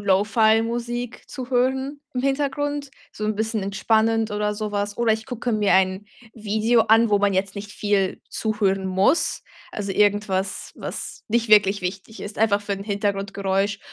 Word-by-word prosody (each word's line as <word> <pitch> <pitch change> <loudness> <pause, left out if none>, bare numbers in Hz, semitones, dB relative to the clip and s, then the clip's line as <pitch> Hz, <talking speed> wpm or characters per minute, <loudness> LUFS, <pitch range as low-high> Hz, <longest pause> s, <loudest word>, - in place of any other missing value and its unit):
Lo-Fi-Musik 225 +4 +1
zu 255 -1 -7
hören 265 +3 0
im 250 - -1
Hintergrund, 285 +1 -1 0.2
so 215 - -6
'n 215 0 0
bisschen 220 0 -1
entspannend 220 +3 +1
oder 210 0 -1
so 210 0 -4
was. 205 0 -2
Oder 235 -2 +2
ich 220 0 -3
gucke 245 0 -3
mir 210 -2 +2
ein 190 +1 +2 0.3
Video 220 +2 +2
an, 225 0 +4
wo 205 - +4
man 200 -1 +2
jetzt 190 +1 -1
nicht 205 +1 -7
viel 200 -2 0
zuhören 200 -3 0
muss. 190 - +2 0.3
Also 200 -2 -4
irgendwas, 205 -2 0
was - - -6
nicht 230 0 +1
wirklich 200 -2 +5
wichtig 195 +4 -5
ist, 205 - -7
einfach 205 -2 +2
für 205 - -3
'n 195 0 -4
Hintergrundgeräusch 200 -1 -1
210 Hz, 160 wpm, -23 LUFS, 200-230 Hz, 0.3 s, wirklich